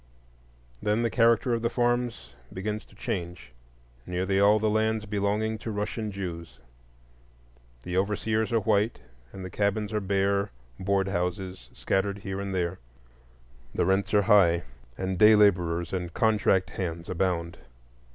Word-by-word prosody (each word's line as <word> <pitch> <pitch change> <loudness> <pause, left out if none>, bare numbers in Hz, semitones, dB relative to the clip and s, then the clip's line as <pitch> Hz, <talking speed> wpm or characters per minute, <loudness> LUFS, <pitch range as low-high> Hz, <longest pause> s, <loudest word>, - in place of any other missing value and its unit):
Then 105 +3 +1
the 115 - 0
character 115 +1 +3
of 115 - 0
the 115 - +1
farms 120 0 -1 0.2
begins 105 +3 -4
to - - -21
change. 85 -6 -5 0.6
Nearly 95 +2 0
all 100 +2 +6
the 110 0 0
lands 110 0 +1
belong 105 +2 -1
to - - -6
Russian 105 +1 -3
Jews; 90 -4 -6 1.3
the 90 - -4
overseers 105 +3 0
are 115 -1 +2
white, 105 +2 +1 0.3
and 95 -1 -8
the 90 - -7
cabins 105 +2 -1
are 105 - 0
bare 100 +1 +1 0.3
board 95 0 +1
houses 90 0 -3
scattered 100 +1 0
here 95 -1 -5
and 100 0 -4
there. 90 0 -1 1.0
The - - +2
rents 95 +2 +1
are 105 - +5
high, 95 -5 +5 0.3
and 95 -1 -2
day 110 +1 +8
laborers 85 -5 +2
and 90 -2 -3
"contract" 100 -3 +2
hands 85 -4 -4
abound. 85 -2 -1
100 Hz, 140 wpm, -27 LUFS, 95-110 Hz, 1.3 s, day